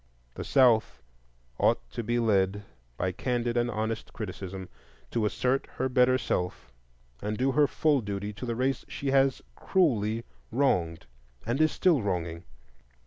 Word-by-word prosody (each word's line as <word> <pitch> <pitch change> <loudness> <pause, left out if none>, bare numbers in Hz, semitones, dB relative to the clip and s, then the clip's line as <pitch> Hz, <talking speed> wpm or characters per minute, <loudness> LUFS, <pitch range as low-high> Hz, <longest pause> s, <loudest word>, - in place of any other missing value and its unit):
The - - -6
South 110 - +3 0.6
ought - - +2
to - - -3
be 120 +2 -1
led, 105 -3 +2 0.3
by 95 - 0
candid 120 +4 -1
and 120 0 +1
honest 110 0 -3
criticism, 95 -3 -6 0.4
to 110 -3 +1
assert 130 +5 0
her 130 +1 -1
better 130 0 +4
self 90 - -3 0.5
and 105 +1 -2
do 135 +2 +2
her 145 +2 +4
full 150 -3 +2
duty 100 0 -4
to 125 +5 -7
the 115 - -1
race 130 +3 0
she 140 -1 -3
has 135 -1 +3
cruelly 115 - +1 0.3
wronged 90 -11 +1 0.4
and 120 +6 0
is 155 - +4
still 170 -8 +3
wronging. 85 -4 -3
115 Hz, 145 wpm, -28 LUFS, 100-130 Hz, 0.6 s, better